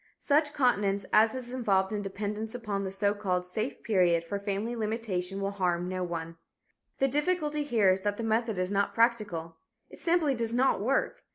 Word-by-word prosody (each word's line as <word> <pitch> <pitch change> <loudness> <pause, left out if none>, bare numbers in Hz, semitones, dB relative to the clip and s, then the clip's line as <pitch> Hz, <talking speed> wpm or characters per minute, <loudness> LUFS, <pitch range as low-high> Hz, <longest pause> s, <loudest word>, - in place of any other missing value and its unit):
Such 295 0 +2
continence 205 -7 +2
as 220 +3 +5
is 250 -1 -6
involved 200 -5 +1
in 210 - -1
dependence 210 +3 -4
upon 210 -5 -3
the 190 - -2
so 200 +1 0
called 185 -3 -1
"safe 215 +8 -4
period" 175 -5 +3
for 200 +4 -4
family 205 +4 -2
limitation 210 -4 -2
will 195 0 -1
harm 180 -3 0
no 185 0 -2
one. 165 -1 -5 0.6
The 270 - +3
difficulty 300 +1 0
here 230 -9 +3
is 190 +1 0
that 205 +1 -1
the 230 - -4
method 225 -1 0
is 185 +1 -1
not 200 0 0
practical. 205 -9 +1 0.3
It - - -12
simply 335 -4 +2
does 230 -2 -2
not 250 -4 +2
work. 265 +6 0
210 Hz, 185 wpm, -29 LUFS, 190-240 Hz, 0.6 s, as